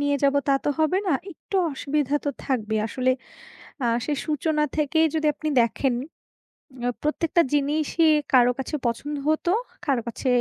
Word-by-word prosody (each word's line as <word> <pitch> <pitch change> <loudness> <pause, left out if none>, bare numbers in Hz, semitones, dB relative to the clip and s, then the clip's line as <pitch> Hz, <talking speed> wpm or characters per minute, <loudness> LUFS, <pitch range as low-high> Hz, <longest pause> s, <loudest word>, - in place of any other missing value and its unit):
নিয়ে 285 0 +2
যাব 280 0 +4
তা, - - +5
তো - - +1
হবে 315 +4 +2
না। 350 - +2 0.2
একটু 385 +3 -5 0.2
অসুবিধা 285 0 -1
তো 285 - 0 0.2
থাকবেই। 220 -5 -1
আসলে 255 +3 0 0.7
আ - - +2 0.2
সেই 295 -2 -1
সূচনা 305 0 0
থেকেই 315 +2 +3
যদি 310 -1 +1
আপনি 310 +1 -3
দেখেন, 245 +3 +1 0.9
আ - - +2
প্রত্যেকটা 320 +3 +1
জিনিসই 300 +3 +2 0.3
কারো 250 -1 +6
কাছে 270 - -3
পছন্দ 265 +6 -2
হত, 310 +2 +1 0.4
কারো 270 -6 +1
কাছে 235 +3 -4
290 Hz, 155 wpm, -24 LUFS, 260-310 Hz, 0.9 s, কারো